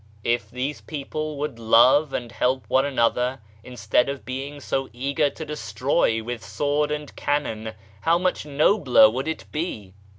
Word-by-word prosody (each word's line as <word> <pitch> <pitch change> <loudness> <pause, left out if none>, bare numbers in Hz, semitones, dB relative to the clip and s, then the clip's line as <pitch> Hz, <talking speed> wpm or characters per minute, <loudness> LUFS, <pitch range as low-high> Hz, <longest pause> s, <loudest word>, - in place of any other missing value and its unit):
If 120 -2 0
these 130 +5 -4
people 155 0 -5
would 145 -5 -4
love 125 +6 +5
and 120 -3 -4
help 125 +1 0
one 130 +4 +3
another 125 -1 +1 0.2
instead 125 +1 0
of 140 -1 -6
being 135 +3 -5
so 135 -1 -2
eager 140 +4 0
to 160 - -8
destroy 115 - 0
with 120 -1 -5
sword 145 +8 0
and 150 -1 -5
cannon, 110 -7 -2 0.3
how 165 +7 +3
much 180 +1 0
nobler 145 - +4
would 130 +5 -3
it 160 - -4
be 110 - -4
135 Hz, 155 wpm, -24 LUFS, 115-150 Hz, 0.3 s, love